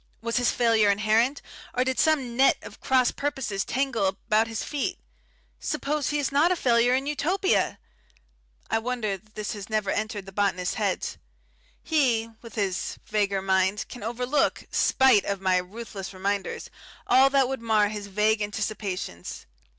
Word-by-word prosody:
Was 230 +2 -2
his 245 -1 +3
failure 225 -3 +3
inherent, 220 +7 +2 0.3
or 250 - +3
did 260 0 -1
some 275 -7 +2
net 270 +2 +5
of - - -11
cross 255 -2 +3
purposes 265 -9 -2
tangle 260 -6 0
about 215 +3 +1
his 225 -1 -4
feet? 290 -2 -2 0.6
Suppose 295 0 -1
he 295 - 0
is 285 -2 -1
not 300 +6 +4
a - - +3
failure 245 -4 +3
in 265 +1 -1
Utopia!... 340 +7 +1 0.9
I 225 - +1
wonder 225 -4 -2
that 215 +2 -29
this 215 -1 -3
has 205 -1 -8
never 215 -3 0
entered 215 -3 -3
the 195 - -10
botanist's 190 -2 0
head. - - -1 0.8
He, 245 -8 +1
with 230 -2 -12
his 195 -4 -2
vaguer 200 -2 0
mind, 190 +2 +1
can 245 - -9
overlook 250 +6 0
spite 260 -6 +4
of 200 -1 -2
my 185 -1 +2
ruthless 195 +1 -6
reminders 200 +1 -3 0.3
all 260 +2 +6
that 270 -2 +3
would 265 -2 -4
mar 215 -3 +3
his 210 -1 -6
vague 210 +2 +1
anticipations. 205 - -4
225 Hz, 160 wpm, -26 LUFS, 200-260 Hz, 0.9 s, all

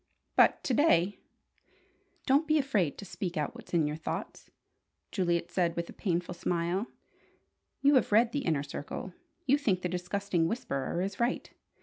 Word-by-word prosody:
But - - +5
to 260 - 0
day 205 - +3 0.6
" - - -37
"Don't 285 +4 +3
be 310 0 +4
afraid 215 - +1
to 200 - -8
speak 180 -2 -4
out 150 -2 -1
what's - - -12
in 165 -3 +3
your 150 0 -2
thoughts," 160 - -5 0.6
Juliet 170 -3 0
said 170 -2 +1
with 170 0 -3
a - - -12
painful 180 -2 -1
smile. 175 +4 -1 1.0
"You 285 +1 +6
have 260 - +3
read 230 +3 +5
the 290 - -1
Inner 155 -4 +1
Circle. 145 +5 -6 0.3
You 280 +1 +4
think 190 -10 +1
the - - +1
disgusting 180 -1 0
'Whisperer' 170 - -2
is 195 0 -4
right! 240 +2 0
180 Hz, 165 wpm, -30 LUFS, 170-235 Hz, 1.0 s, You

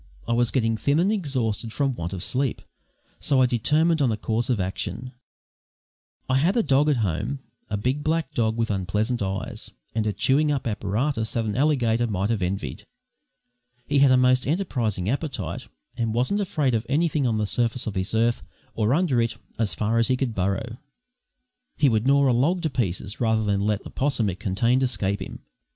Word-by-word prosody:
I 115 - +1
was 120 0 +3
getting 115 -4 +1
thin 140 +6 +1
and 185 +5 +3
exhausted 125 - -1
from 135 +2 0
want 85 -6 -5
of 95 -2 -5
sleep, 130 -1 -1 0.6
so 140 -3 +2
I 130 - +6
determined 150 +7 +2
on 130 -4 +3
a 110 - -1
course 115 +3 -1
of 120 -5 +1
action. 105 +6 -3 1.2
I 130 - +2
had 180 - +2
a 230 - +3
dog 145 0 +3
at 145 - +2
home, 105 - -2 0.3
a 105 - -1
big 130 +7 -1
black 155 -2 -1
dog 110 -4 0
with 115 -1 0
unpleasant 105 +5 -1
eyes, 95 0 -4 0.2
and 110 0 0
a - - +1
chewing 140 +9 +2
up 140 -3 -1
apparatus 110 +3 -1
that 115 -1 0
an 105 - -2
alligator 120 -5 +2
might 100 0 -1
have 110 -4 -1
envied. 95 +3 -3 1.0
He 145 -1 +2
had 140 -1 +6
a 130 - +5
most 125 0 +3
enterprising 125 - -1
appetite, 125 - -3 0.3
and 115 -2 -1
wasn't 130 - +1
afraid 155 -10 0
of 110 -1 +1
anything 150 -1 +1
on 110 -2 0
the 105 - 0
surface 120 +3 -1
of 110 - -3
this 95 +3 -2
earth 115 +1 +2 0.3
or 110 +4 +1
under 155 -9 +2
it 115 0 -1 0.2
as 110 -4 0
far 110 +2 +1
as 115 - +3
he 130 -1 +1
could 125 -3 -1
burrow. 100 +5 -2 1.0
He 145 -3 +4
would 110 +1 +1
gnaw 140 0 +4
a 125 - +3
log 165 +9 +1
to 160 - 0
pieces 100 -3 -2
rather 110 -2 +2
than 100 -2 0
let 105 -1 0
the - - -10
'possum 130 -7 0
it 90 - -9
contained 115 +6 +1
escape 100 -6 0
him. - - -7
120 Hz, 195 wpm, -24 LUFS, 105-140 Hz, 1.2 s, I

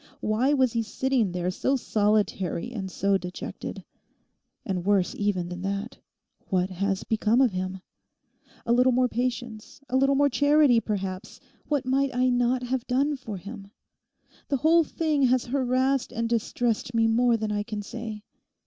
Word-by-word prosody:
Why 225 +6 +1
was 260 -4 +2
he 230 - +1
sitting 230 -1 0
there 180 0 -2
so 265 +8 0
solitary 210 -3 0
and 195 -5 -5
so 195 +1 +1
dejected? 180 0 -7 0.8
And 185 -3 -2
worse 195 -1 +2
even 190 -4 -1
than 180 0 -6
that, 200 +4 -4 0.5
what 185 0 0
has 195 +1 -1
become 220 +2 +1
of 260 -4 +4
him? 185 0 -4 0.8
A 235 - +2
little 250 +1 +4
more 250 +1 +3
patience, 245 +1 -4
a 255 - -1
little 275 +1 +3
more 285 +1 +4
charity, 285 -2 +4
perhaps—what 205 +7 -4
might 265 0 +1
I 255 +1 +3
not 245 +1 +1
have 250 0 -2
done 275 +4 +1
for 225 -7 -7
him? 200 +2 -9 0.8
The 275 - 0
whole 325 +4 +4
thing 310 -1 -1
has 255 0 +2
harassed 260 0 0
and 230 -1 -2
distressed 235 0 -1
me 225 0 +4
more 235 +1 +3
than 215 -1 -3
I 205 0 0
can 210 -1 -5
say. 220 -1 -7
235 Hz, 160 wpm, -26 LUFS, 200-255 Hz, 0.8 s, of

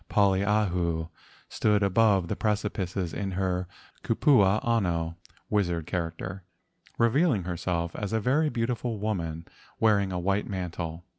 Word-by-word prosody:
Poliahu 95 -5 +1 0.4
stood 105 -1 +1
above 100 -2 +3
the - - -2
precipices 100 -4 -2
in 100 -2 -3
her 90 -1 -1 0.4
kupua 105 -8 +4
ano 85 -8 0 0.3
(wizard 90 -6 0
character), 90 +2 -4 0.5
revealing 115 - +3
herself 85 -1 -2
as 105 -2 -4
a 110 - +1
very 145 +8 +2
beautiful 120 -2 -2
woman 85 -6 -3 0.3
wearing 100 -3 +3
a 90 - -2
white 100 +3 0
mantle. 85 -3 -5
95 Hz, 120 wpm, -27 LUFS, 85-105 Hz, 0.5 s, kupua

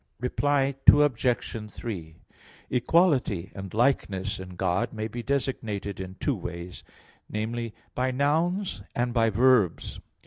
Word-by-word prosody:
Reply 140 +2 +1
Obj. 125 -6 +4
3: 85 -9 -6 0.6
Equality 125 - +2
and 95 -1 -7
likeness 105 -6 0
in 90 -1 -8
God 110 +7 0
may 110 0 -3
be 120 +2 -6
designated 115 -7 -2
in 95 0 -6
two 145 - 0
ways 90 -2 -7 0.5
namely, 115 +1 -3 0.2
by 130 +1 0
nouns 160 +9 0
and 120 0 0
by 115 -1 +3
verbs. 115 -4 +2
115 Hz, 115 wpm, -27 LUFS, 100-135 Hz, 0.6 s, Obj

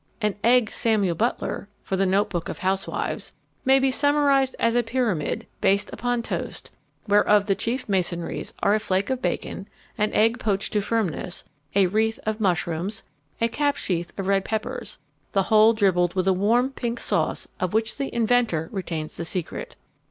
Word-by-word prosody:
An 210 -2 0
Egg 240 -1 +4
Samuel 210 -6 +1
Butler, 210 +1 -2
for 195 - -2
the 195 0 +2
notebook 190 -2 0
of - - -5
housewives, 190 +1 -2 0.3
may 265 +1 +5
be 270 0 +3
summarized 280 -1 +3
as 230 - +2
a 245 - +3
pyramid, 230 - -1 0.2
based 200 +1 +2
upon 245 -1 -1
toast, - - -5 0.4
whereof 205 0 +4
the 200 - +2
chief 230 +6 -2
masonries 175 -4 -1
are 200 - +4
a 215 - +3
flake 195 +1 0
of 260 -1 -1
bacon, - - -3 0.3
an 210 0 +2
egg 225 +3 +3
poached 200 -5 -1
to 210 - +2
firmness, 195 -5 -2 0.3
a 200 -1 +5
wreath 220 +6 +1
of 215 0 -1
mushrooms, 180 +2 -1 0.4
a 230 - +3
cap 285 +4 0
sheaf 175 -8 -2
of 195 - -3
red 195 0 +2
peppers; 220 +1 -4 0.4
the 195 - +3
whole 215 +2 +6
dribbled 185 -5 +2
with 185 0 0
a 190 - +5
warm 230 +8 +2
pink 240 -3 -3
sauce - - -1
of 185 +2 -1
which 220 0 +1
the 275 - -3
inventor 230 -8 +1
retains 165 -5 -4
the - - -3
secret. 175 -1 -4
210 Hz, 170 wpm, -24 LUFS, 190-235 Hz, 0.4 s, whole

